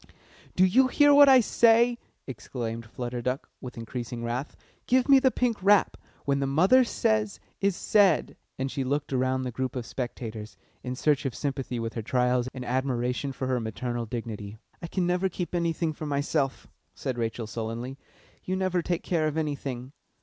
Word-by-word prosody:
"Do 185 - +5
you 255 +8 +4
hear 290 +2 +5
what 285 0 +8
I 260 -2 +8
say?" 235 +2 +4 0.3
exclaimed 115 -1 -6
Flutter 120 +1 -5
Duck, 125 +3 -2
with 125 -2 -8
increasing 120 +1 -5
wrath. 120 +5 -3 0.3
"Give 255 0 +3
me 275 -1 +7
the 260 0 +4
pink 245 -3 0
wrap! 200 +1 +4 0.3
When 140 -1 +1
the 135 - 0
mother 185 - +5
says 220 -3 0 0.2
is 200 -2 +1
said!" 200 -6 +3 0.2
And 130 0 -2
she 135 - -2
looked 140 +2 -2
around 130 0 +1
the 125 - -3
group 130 +2 -3
of 125 -2 -3
spectators, 115 -4 -6 0.2
in 125 0 -4
search 145 +2 +1
of 130 - -5
sympathy 135 -4 -3
with 115 0 -4
her 115 - -3
trials 125 +2 +1
and 130 -1 -7
admiration 125 +1 -1
for 135 - -4
her 130 -1 0
maternal 120 +1 -4
dignity. 110 -3 -6 0.2
"I 170 - -5
can 180 +1 -1
never 180 +2 +1
keep 180 0 -5
anything 165 -2 0
for 155 0 -6
myself," 140 -1 -1 0.3
said 125 -2 -4
Rachel 115 0 -2
sullenly. 115 +4 -5 0.4
"You 185 - -2
never 185 -1 0
take 170 0 -2
care 160 -3 0
of 155 +1 -3
anything." 140 -4 -3
135 Hz, 180 wpm, -27 LUFS, 120-180 Hz, 0.4 s, what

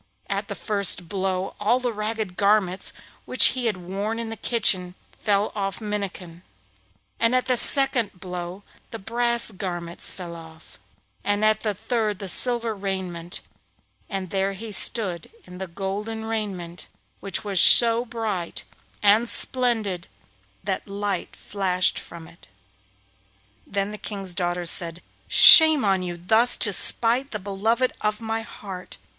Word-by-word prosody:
At 200 +1 -3
the 200 - -6
first 200 -5 -2
blow 190 0 -3
all 225 +5 +1
the 245 -2 -3
ragged 215 -2 -4
garments 200 -2 +1 0.3
which 255 - +7
he 255 -2 -2
had 210 -4 -1
worn 195 +5 -5
in 230 -1 -5
the - - -5
kitchen 190 -6 +1 0.2
fell 205 0 -1
from 210 - -6
off 195 0 -3
Minnikin, 200 -5 -6 0.8
at 250 +2 +1
the 255 - +1
second 245 -7 +3
blow 180 +1 -7 0.3
the 225 - -7
brass 235 +2 +2
garments 175 -3 -5
fell 175 -2 -9
off, 160 -1 -15 0.4
and 205 +1 0
at 215 0 +2
the 210 -2 -3
third 215 -1 -2
the 195 -1 -8
silver 235 +1 +3
raiment, 190 -4 -6 0.7
and 190 -3 -5
there 195 0 -1
he 215 +3 -9
stood 195 -5 -2 0.2
in 180 0 -12
the 190 - -6
golden 205 +5 -5
raiment, 195 -6 -6 0.3
which 195 0 -3
was 200 -3 +2
so 235 0 +8
bright 225 -7 -5 0.4
and 215 +3 +3
splendid 220 -8 0 0.6
that 195 +1 -4
light 200 -2 -4
flashed 185 -2 -1
from 165 -1 -12
it. 170 -6 -19 1.2
Then 200 0 -2
the 210 - -8
King's 195 -4 -5
daughter 175 -1 -2
said: 170 0 +2 0.2
'Shame 315 -6 +8
on 195 -2 +2
you 175 -1 -5
thus 220 +8 +3
to 205 - +3
smite 240 +8 +3
the 215 - -4
beloved 215 +6 -1
of 210 0 -1
my 225 0 -4
heart. 195 -5 -10
200 Hz, 145 wpm, -23 LUFS, 185-225 Hz, 1.2 s, so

